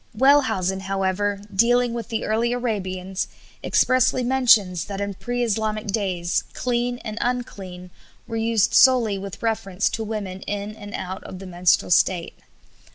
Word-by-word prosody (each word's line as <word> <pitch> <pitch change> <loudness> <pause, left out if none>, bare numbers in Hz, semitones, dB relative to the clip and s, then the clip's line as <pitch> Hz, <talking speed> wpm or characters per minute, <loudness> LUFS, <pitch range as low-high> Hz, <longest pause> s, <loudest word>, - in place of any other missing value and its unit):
Wellhausen, 260 -9 +3
however, 195 +1 -1
dealing 245 +3 +3
with 230 -2 -5
the 225 -2 -2
early 230 +3 +1
Arabians, 190 -6 -3 0.4
expressly 255 0 +3
mentions 230 -9 +3
that 200 -1 -6
in 200 0 -2
pre 245 +5 -3
Islamic 215 -1 -1
days, 190 -4 -1
"clean" 245 0 -1
and 215 0 -5
"unclean" 190 -7 -4 0.3
were 230 - -6
used 225 -1 +1
solely 235 -7 +5
with 195 +2 -8
reference 210 -4 0
to 225 - -3
women 205 -4 -5
in 205 +1 -4
and 205 -1 -8
out 185 +1 -5
of 185 - -8
the 190 - -9
menstrual 180 0 +1
state. 175 0 +2
210 Hz, 145 wpm, -23 LUFS, 190-235 Hz, 0.4 s, solely